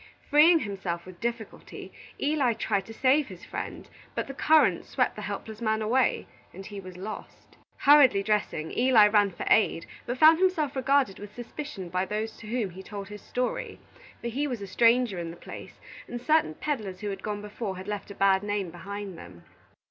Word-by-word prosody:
Freeing 315 +4 +7
himself 195 - -4
with 185 -1 -12
difficulty, 235 -2 -6 0.3
Eli 280 -5 +2
tried 200 -3 -1
to - - -9
save 265 +5 +2
his 185 -3 -11
friend; - - -6 0.3
but - - -1
the 275 - -7
current 310 +3 +4
swept - - 0
the - - -7
helpless 220 0 -6
man 220 -1 +1
away, 235 +4 +1 0.3
and 195 +1 -9
he 205 -1 -7
was 185 -2 -10
lost. 210 +4 -9 0.2
Hurriedly 275 -8 +6
dressing, 205 -7 -1
Eli 240 -4 +6
ran 205 -1 +4
for 175 - -7
aid, 205 -6 +3 0.2
but 245 - -2
found 315 +3 +7
himself 350 -7 +1
regarded 270 -5 +2
with 205 +1 -10
suspicion 240 -5 -7
by 185 +2 0
those 215 +3 -3
to 220 - -11
whom 225 -4 -2
he 185 +2 -9
told 200 0 -8
his 210 -1 -9
story; 250 0 -3 0.4
for 235 - -3
he 280 +5 -1
was 245 -5 -3
a 200 - -6
stranger 230 +1 +3
in 170 -1 -4
the 170 - -9
place - - -10 0.3
and 240 - -5
certain 305 - +2
peddlers 215 - -4
who 205 -1 -3
had 195 -1 -6
gone 210 0 -4
before 210 -2 -5
had 185 - -8
left 210 -1 -4
a 200 - -9
bad 195 -1 +3
name 205 -3 -2
behind 195 +1 -7
them. 85 -2 -12
215 Hz, 195 wpm, -27 LUFS, 195-255 Hz, 0.4 s, Freeing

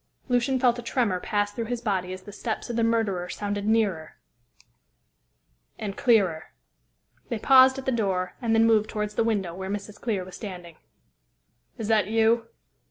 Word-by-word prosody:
Lucian 250 +1 +1
felt 245 -1 +3
a - - -4
tremor 230 -6 0
pass 205 +2 -1
through 230 +2 -4
his 240 +1 -3
body 190 -5 -2
as 185 0 -7
the 205 - -10
steps 220 +3 -4
of - - -4
the 230 - +1
murderer 215 -6 0
sounded 205 +1 -3
nearer 205 -8 0 1.6
and 200 -2 -5
clearer. 195 -10 +1 0.7
They 235 - -1
paused 265 +3 +6
at 265 - -6
the 265 - +1
door, 190 -6 -1
and 225 -2 +1
then 225 0 +5
moved 220 -2 +3
towards 210 -1 -3
the 230 - +1
window 200 -6 -1
where 190 +2 -6
Mrs. 205 +1 -6
Clear 205 -6 -2
was 185 - -11
standing. 180 -6 -8 1.0
"Is 225 -3 -4
that 215 -4 +3
you?" 225 +1 +2
215 Hz, 170 wpm, -26 LUFS, 190-230 Hz, 1.6 s, paused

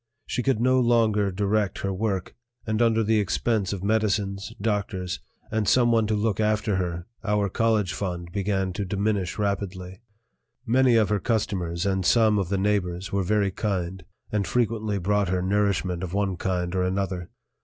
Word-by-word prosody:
She 125 - -2
could 130 -3 +1
no 130 +2 +3
longer 115 -4 +3
direct 100 +1 0
her 95 -1 -1
work, 95 -2 -2 0.3
and 110 +1 0
under 115 -1 +3
the 110 +1 +2
expense 105 0 0
of 100 -2 -4
medicines, 100 -2 0
doctors, 100 -4 -2 0.3
and 110 -2 0
someone 115 -2 +4
to 110 - +1
look 105 -1 0
after 105 -2 +1
her 85 -2 -3 0.2
our 105 -2 +1
college 110 -3 +1
fund 85 -3 -4
began 95 -1 -1
to 100 - -3
diminish 100 -1 -1
rapidly. 100 -2 -3 0.6
Many 125 +1 +4
of 110 -2 +3
her 105 -1 +1
customers 90 -6 -1
and 95 -1 0
some 110 +1 +4
of 95 -3 -2
the 100 - 0
neighbors 95 -2 -1
were 100 - +1
very 100 +1 +1
kind, 95 -3 -3 0.3
and 105 -2 0
frequently 110 -3 0
brought 100 +1 +1
her 90 0 0
nourishment 95 -2 0
of 95 0 -4
one 100 -2 0
kind 90 -1 -2
or 95 - +1
another. 90 -1 -2
100 Hz, 165 wpm, -25 LUFS, 95-110 Hz, 0.6 s, someone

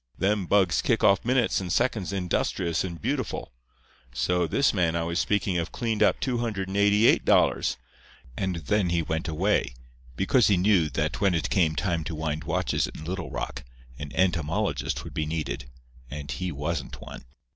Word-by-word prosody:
Them 100 -1 0
bugs 95 -4 +3
kick - - +1
off 100 0 +4
minutes 125 -4 +2
and 90 -2 -4
seconds 110 -3 0
industrious 90 -2 -1
and 85 -3 -5
beautiful. - - -3 0.6
So, 90 +5 +1
this 140 - +2
man 85 -5 +1
I 85 - 0
was 85 +1 -1
speaking 100 -3 +1
of 85 - -3
cleaned 115 -3 -2
up - - +4
$288; 105 -3 +2 0.6
and 95 -2 -2
then 90 +4 0
he 85 -1 +1
went 80 +2 -3
away, 80 -6 0 0.4
because 105 - +3
he 100 - +4
knew 90 -4 +3
that 70 - -2
when 100 -3 +3
it 85 - -1
came 80 -5 +2
time 85 +1 -1
to 80 - -4
wind 80 0 -3
watches - - 0
in 75 - -9
Little 90 0 -4
Rock - - -5 0.4
an 75 -1 -6
entomologist 85 - 0
would - - -9
be 75 -1 -2
needed, 75 -5 -4 0.4
and 70 0 -6
he 90 +7 -3
wasn't 75 +1 -4
one. - - -10
90 Hz, 165 wpm, -26 LUFS, 80-100 Hz, 0.6 s, off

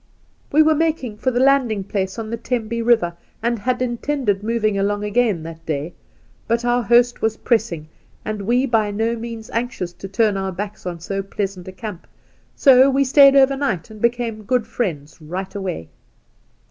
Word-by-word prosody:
' - - -38
We 310 +2 +6
were 315 0 +4
making 305 -8 -1
for 260 - 0
the 245 -1 0
landing 255 -6 +3
place 190 0 -3
on 220 -1 -5
the - - -1
Tembe 230 -1 -2
River, 225 -8 +2 0.3
and 235 -1 0
had 250 +3 0
intended 240 -4 -1
moving 215 -1 0
along 205 +1 0
again 210 -5 +1
that 165 0 -9
day; 155 +1 -3 0.5
but 235 +1 0
our 245 0 +2
host 240 +2 +3
was 220 0 0
pressing, 215 -10 0 0.4
and 215 -1 -3
we 245 +6 +2
by 225 -5 +1
no 225 +3 -1
means 230 -1 -7
anxious 230 -7 -3
to 195 - -9
turn 210 0 +1
our 190 0 -2
backs 200 +1 -6
on 175 -1 -4
so 195 +3 -3
pleasant 195 -2 -5
a - - -6
camp, 195 -2 -8 0.5
so 265 -1 +6
we 275 +1 +3
stayed 275 +1 +6
overnight, 270 - +2
and 215 -1 -12
became 235 -2 0
good 240 +2 0
friends 165 -11 -4
right 185 +5 -5
away. 185 - -4
220 Hz, 180 wpm, -21 LUFS, 195-245 Hz, 0.5 s, We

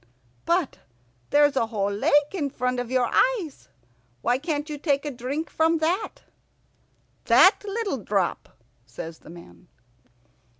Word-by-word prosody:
"But 345 -4 0 0.5
there's 290 0 +4
a 230 - +1
whole 205 -3 -1
lake 290 - +2
in 300 -7 -2
front 250 -2 -2
of 245 -1 -4
your 255 -1 +1
eyes. 415 - 0 0.5
Why 245 +2 +1
can't 295 0 -3
you 300 -2 -6
take 285 -1 0
a 295 - -2
drink 270 +6 -4
from 325 +1 +1
that?" 345 +7 -2 1.0
"That 380 - +6
little 405 - -3
drop!" 195 -3 -1 0.4
says 160 +7 -8
the - - -16
man. 125 - -14
285 Hz, 135 wpm, -25 LUFS, 240-320 Hz, 1.0 s, That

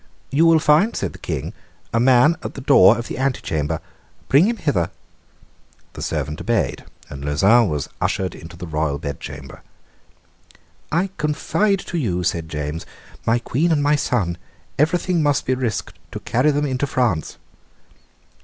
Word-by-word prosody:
"You 155 +5 +4
will 165 -1 +6
find," 155 +8 +3
said - - -3
the - - -12
King, - - -4 0.4
"a 115 - +2
man 130 +6 +5
at - - -6
the 135 - -6
door 120 -6 +6
of 120 - -5
the - - -5
antechamber; 80 - -1 0.5
bring 145 +7 +6
him 235 0 -1
hither." 140 - 0 1.0
The - - -8
servant 75 -1 -3
obeyed, - - -1 0.2
and 70 -1 -8
Lauzun 100 +10 +4
was 75 -2 -2
ushered 95 -1 -1
into 85 +1 -11
the 90 - -7
royal 75 -3 -1
bedchamber. 70 -2 -7 1.3
"I 180 +4 0
confide 180 +6 0
to 175 - -4
you," 90 - -1
said 80 -2 -1
James, 75 +1 -4 0.4
"my 115 +1 +4
Queen 140 +8 0
and 145 -3 +2
my 145 +1 +4
son; 100 -11 -1 0.4
everything 175 +2 +2
must 145 -2 +1
be 130 - +1
risked 125 -5 -3
to - - -4
carry 125 +6 +1
them 145 0 +1
into 135 0 -1
France." 115 - -1
120 Hz, 155 wpm, -21 LUFS, -, 1.3 s, will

